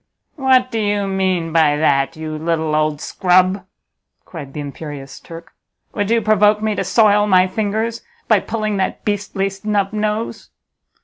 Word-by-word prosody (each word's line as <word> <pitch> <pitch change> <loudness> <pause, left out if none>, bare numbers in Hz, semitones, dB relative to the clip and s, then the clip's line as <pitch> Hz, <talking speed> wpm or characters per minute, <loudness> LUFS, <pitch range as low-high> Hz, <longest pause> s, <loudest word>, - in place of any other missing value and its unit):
"What 260 -3 +2
do 225 - -2
you 205 -1 0
mean 185 -4 -1
by 155 -3 +3
that, 145 0 +1
you 155 -1 -5
little 160 0 -1
old 155 -1 0
scrub!" 185 +2 +1 0.6
cried 150 -6 -9
the - - -6
imperious 145 -1 -8
Turk; 165 0 -12 0.4
"would 205 -1 -2
you 230 -1 +2
provoke 210 0 +4
me 215 0 -1
to - - -2
soil 210 -2 +3
my 185 -2 +5
fingers 220 +4 -2 0.3
by - - +4
pulling 215 -2 -3
that 190 - -2
beastly 205 -1 -1
snub 200 0 -2
nose?" 215 +1 -3
195 Hz, 150 wpm, -18 LUFS, 160-210 Hz, 0.6 s, my